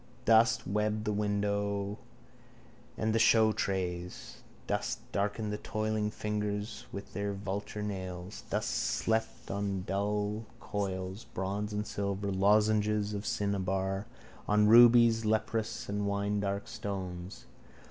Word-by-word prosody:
Dust 115 0 +5
webbed 105 +2 0
the 105 - 0
window 100 0 -1 1.0
and 110 0 0
the 115 - +3
showtrays. 95 -6 +1 0.3
Dust - - -1
darkened 105 +1 -1
the 105 - -3
toiling 110 0 -1
fingers 105 0 -3
with 100 +1 -8
their 100 0 -2
vulture 100 +1 -4
nails. 95 -2 -5
Dust - - -1
slept 110 - -1
on 100 -1 -2
dull 105 +2 -1
coils 95 0 -3
of - - -26
bronze 100 +3 -2
and 105 0 -2
silver, 100 -1 -2
lozenges 105 +1 +3
of 100 0 -4
cinnabar, 95 -2 -1 0.4
on 105 0 +4
rubies, 115 0 +7
leprous 110 0 -1
and 100 0 -1
winedark 100 0 -1
stones. 95 -2 -5
105 Hz, 115 wpm, -31 LUFS, 100-105 Hz, 1.0 s, rubies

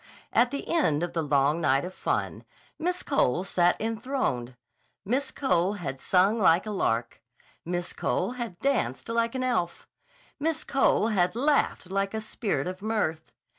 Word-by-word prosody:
At 245 +1 +4
the 280 - -5
end 170 - +2
of 175 - -3
the 165 - 0
long 145 +2 +2
night 135 0 +2
of 185 - -7
fun, - - -2 0.4
Miss 360 +2 -1
Cole 180 - +1
sat 175 -2 +2
enthroned. 225 - -2 0.5
Miss 260 +7 0
Cole 185 -7 +1
had 135 -10 -5
sung 195 +8 +3
like 180 -1 +4
a 215 - -4
lark. 115 - -1 0.4
Miss 175 +1 -3
Cole - - -1
had 235 -8 -5
danced 240 - -1
like 230 +1 0
an 260 - -1
elf. 225 -9 -1 0.5
Miss 320 +2 -1
Cole 265 -5 +2
had 180 -3 +1
laughed 275 -8 +1
like 195 +2 -1
a - - -1
spirit 210 - -2
of 185 +1 -5
mirth. 205 -8 -2
195 Hz, 160 wpm, -27 LUFS, 170-240 Hz, 0.5 s, At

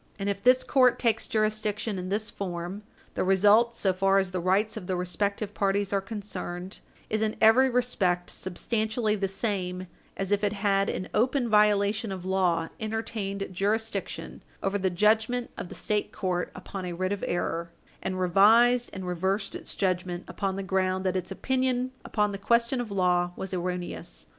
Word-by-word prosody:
And 200 0 -3
if 200 0 -2
this 255 +1 +5
court 255 -3 +4
takes 225 -2 +1
jurisdiction 215 -1 -1
in 180 0 -5
this 210 +1 -1
form, 180 +1 -5 0.3
the - - -1
result, 205 +5 +4
so 195 -4 +1
far 195 +1 +3
as 190 -2 +1
the 185 - -2
rights 195 +5 +1
of 200 -5 -7
the 185 - 0
respective 200 +4 -2
parties 200 0 0
are 195 - +2
concerned, 195 -3 -6 0.3
is 215 0 -1
in 220 0 0
every 235 +4 +6
respect 195 -8 0
substantially 215 +4 -1
the 195 -1 -1
same 185 -3 -2 0.3
as 195 0 -3
if 205 0 +2
it 205 0 +1
had, 200 -1 +1
in 185 - -3
open 250 +2 +2
violation 210 0 +3
of 185 -1 -6
law, 180 -3 +1
entertained 215 -3 -3
jurisdiction 215 +4 -2 0.2
over 195 +1 0
the 190 0 +1
judgment 220 +6 +2
of 175 - -6
the - - -8
State 210 -1 -1
court 180 -2 -2
upon 185 +1 -7
a 180 -1 -4
writ 185 +2 -2
of 205 - -3
error, 170 -1 -2 0.3
and 185 0 -3
revised 225 +7 +5
and 190 -1 -6
reversed 190 +3 -1
its - - -6
judgment 180 -2 -1
upon 195 -1 -2
the 195 - -3
ground 190 0 0
that 185 0 +1
its 180 -1 -2
opinion 255 -1 0
upon 210 -1 0
the 200 - -5
question 235 +4 +2
of 235 - -6
law 180 -2 +1
was 190 0 -6
erroneous. 180 - -4
200 Hz, 175 wpm, -27 LUFS, 185-220 Hz, 0.3 s, every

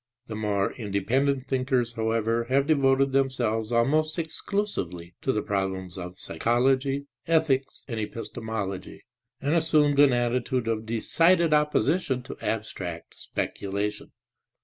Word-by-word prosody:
The 110 - -6
more 105 -2 0
independent 130 +5 0
thinkers 130 -2 +1
however 115 +1 0
have 135 +3 +2
devoted 135 -2 +3
themselves 120 -5 0
almost 155 +8 +2
exclusively 155 - -3
to 130 - +1
the 105 -4 -1
problems 95 -2 -2
of 90 -1 -7
psychology, 130 - +1 0.2
ethics 155 -5 +1
and 115 -4 -3
epistemology 110 -3 -5 0.4
and 145 +3 0
assumed 150 -3 +3
an 145 -2 +7
attitude 120 0 0
of 110 -1 -1
decided 165 +9 +3
opposition 150 -2 +2
to 130 - -8
abstract 95 -6 -4
speculation. 100 +1 -3
120 Hz, 115 wpm, -26 LUFS, 110-140 Hz, 0.4 s, an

